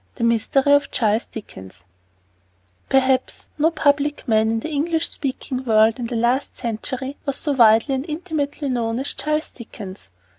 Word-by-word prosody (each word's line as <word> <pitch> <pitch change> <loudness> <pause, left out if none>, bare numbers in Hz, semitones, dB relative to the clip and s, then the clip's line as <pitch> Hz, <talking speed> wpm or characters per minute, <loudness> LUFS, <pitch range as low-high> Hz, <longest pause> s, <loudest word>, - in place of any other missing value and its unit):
THE 235 - -4
MYSTERY 235 +5 +2
OF 285 -1 +3
CHARLES 220 0 +1
DICKENS 95 - -11 1.1
Perhaps 265 -1 +1
no 315 +2 +4
public 290 -2 0
man 220 -1 +3
in 225 0 0
the 315 - -5
English 320 +3 0
speaking 260 -1 -4
world, 220 0 +3
in 240 - -3
the 240 - -4
last 240 +4 0
century, 255 +4 -4
was 275 - 0
so 295 - -1
widely 230 0 +5
and 265 +5 -3
intimately 305 -3 -3
known 235 -3 -1
as 270 +3 -2
Charles 305 +1 -1
Dickens. 205 - -10
260 Hz, 155 wpm, -21 LUFS, 225-285 Hz, 1.1 s, widely